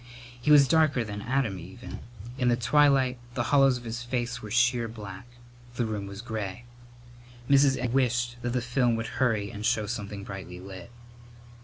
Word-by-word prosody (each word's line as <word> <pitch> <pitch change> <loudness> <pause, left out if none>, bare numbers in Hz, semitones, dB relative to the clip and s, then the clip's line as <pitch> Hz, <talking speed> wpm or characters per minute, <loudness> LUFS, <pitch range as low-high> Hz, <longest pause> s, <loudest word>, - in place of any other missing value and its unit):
He 135 - -1
was 145 -2 +8
darker 155 -4 +3
than 105 -2 -6
Adam 120 -5 -1
even. 95 +9 -9 0.4
In 125 - +2
the 120 - +4
twilight 130 0 +3 0.2
the 120 - 0
hollows 135 -2 +5
of 120 - -11
his 115 +1 -5
face 120 0 -3
were 110 - -8
sheer 120 +1 +2
black. 105 -2 -9 0.5
The 120 - 0
room 105 -3 -4
was 100 +3 -8
gray. 110 -1 -5 0.8
Mrs. 140 0 +5
Egg 125 -2 -2
wished 125 -2 +1
that 120 0 -2
the 125 - 0
film 125 -1 +1
would 115 +2 -4
hurry 110 -5 +1
and 105 -2 -7
show 110 -2 +1
something 105 -3 -5
brightly 95 -2 -8
lit. 95 +3 -10
120 Hz, 175 wpm, -27 LUFS, 105-125 Hz, 0.8 s, was